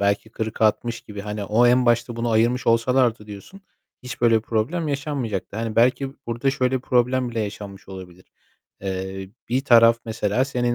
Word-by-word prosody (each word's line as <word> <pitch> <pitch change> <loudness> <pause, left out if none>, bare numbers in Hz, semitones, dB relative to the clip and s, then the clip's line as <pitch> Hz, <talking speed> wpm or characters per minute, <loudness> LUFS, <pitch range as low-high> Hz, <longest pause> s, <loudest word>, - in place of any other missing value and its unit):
belki 100 +2 0
40-60 110 +1 -1
gibi, 105 -1 -9
hani 105 0 -5
o 110 +4 +3
en 125 +1 +3
başta 120 0 +1
bunu 115 0 -1
ayırmış 115 +3 +1
olsalardı 115 -1 +2
diyorsun, 105 - -11 0.4
hiç 125 0 -8
böyle 115 -1 +4
bir 110 - -1
problem 125 +10 -1
yaşanmayacaktı. 135 -10 -3
Hani, 115 -1 -4
belki 130 +3 +2
burada 120 +4 0
şöyle 130 -1 0
problem 125 0 +1
bile 115 -1 -3
yaşanmış 100 -2 -7
olabilir. 90 -2 -11 0.6
Eee, 95 0 -5 0.2
bir 125 +3 +1
taraf 115 -2 +6
mesela 110 +2 0
senin 120 -3 -1
115 Hz, 160 wpm, -22 LUFS, 105-125 Hz, 0.6 s, taraf